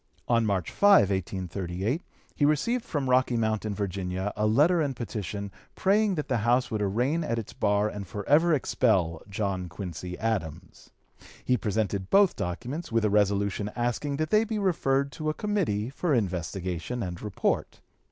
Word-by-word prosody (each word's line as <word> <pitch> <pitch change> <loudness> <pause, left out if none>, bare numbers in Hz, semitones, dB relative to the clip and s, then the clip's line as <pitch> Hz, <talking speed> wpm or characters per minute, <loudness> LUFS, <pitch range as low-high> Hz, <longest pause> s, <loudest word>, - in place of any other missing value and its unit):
On 115 -2 +3
March 95 -4 -1
5, 200 - +5
1838, 95 - -2 0.3
he - - -2
received 155 - +2
from 145 -3 -2
Rocky 130 -1 +3
Mount 110 -1 0
in 105 -2 -2
Virginia 95 0 -3
a 105 0 +1
letter 155 +10 +4
and 140 -3 -1
petition 100 -4 -5 0.2
praying 200 +1 +2
that 150 - -3
the 125 - +1
House 120 +3 +2
would 110 -1 -1
arraign 125 - 0
at 115 -6 -1
its 115 - -5
bar 105 0 +1
and 100 -2 -6
forever 145 - +2
expel 95 - +1
John 95 -3 -2
Quincy 90 -1 -6
Adams. 90 -6 -4 0.6
He 125 - +3
presented 100 -3 -1
both 200 -2 +5
documents, 120 - -4
with 115 -1 +2
a 105 - +2
resolution 100 0 +1
asking 120 +4 -1
that 155 +1 -2
they 215 +1 +5
be 220 -1 -3
referred 140 -8 +1
to 155 +3 -3
a 155 - -2
committee 160 - -1
for 150 +1 0
investigation 95 +2 -2
and 90 -2 -5
report. 105 -3 -2
110 Hz, 160 wpm, -27 LUFS, 100-140 Hz, 0.6 s, 5